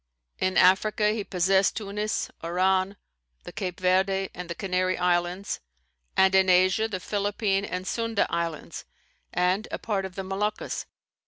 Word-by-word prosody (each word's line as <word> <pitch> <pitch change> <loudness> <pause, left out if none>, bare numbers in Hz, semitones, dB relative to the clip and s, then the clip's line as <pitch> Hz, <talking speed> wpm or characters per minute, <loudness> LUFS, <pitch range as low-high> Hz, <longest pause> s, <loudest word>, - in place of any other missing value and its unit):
In 185 0 0
Africa 210 +3 +4
he 215 -1 -2
possessed 190 +1 +2
Tunis, 210 0 -2
Oran, 185 +3 +1 0.5
the - - -8
Cape 180 -3 -4
Verde 190 +1 +2
and 180 -1 -7
the 170 - -4
Canary 185 -1 0
Islands; 180 +2 0 0.6
and 190 0 +5
in 190 -1 +5
Asia, 185 +4 +4
the 195 -4 -4
Philippine 200 0 0
and 185 -2 -4
Sunda 230 +1 0
Islands 165 -2 -4 0.5
and 180 +4 +1
a - - -3
part 200 -4 -2
of 185 -1 -8
the 195 - -4
Moluccas. 200 +3 -3
190 Hz, 145 wpm, -26 LUFS, 180-200 Hz, 0.6 s, and